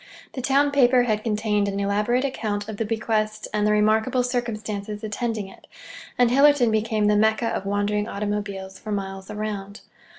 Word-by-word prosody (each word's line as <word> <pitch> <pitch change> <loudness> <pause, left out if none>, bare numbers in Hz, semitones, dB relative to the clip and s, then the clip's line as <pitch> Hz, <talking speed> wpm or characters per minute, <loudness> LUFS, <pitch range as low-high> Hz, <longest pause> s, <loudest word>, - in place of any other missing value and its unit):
The 260 - -4
town 280 +2 +2
paper 255 -3 +4
had 215 -3 0
contained 210 -2 0
an 200 0 -2
elaborate 210 +6 +1
account 210 -6 -3
of 220 -2 -6
the 225 - -1
bequest 215 -1 -1
and 210 0 +1
the - - +3
remarkable 220 +4 +2
circumstances 215 -4 -3
attending 215 -1 -3
it; 195 - -16 0.5
and 245 -1 +4
Hillerton 275 -3 +5
became 220 -1 +1
the 210 0 +4
Mecca 220 +2 +2
of 195 - -3
wandering 205 +1 0
automobiles 200 -2 -4
for 215 - -7
miles 195 -1 -4
around. 205 -1 -5
215 Hz, 165 wpm, -24 LUFS, 205-235 Hz, 0.5 s, Hillerton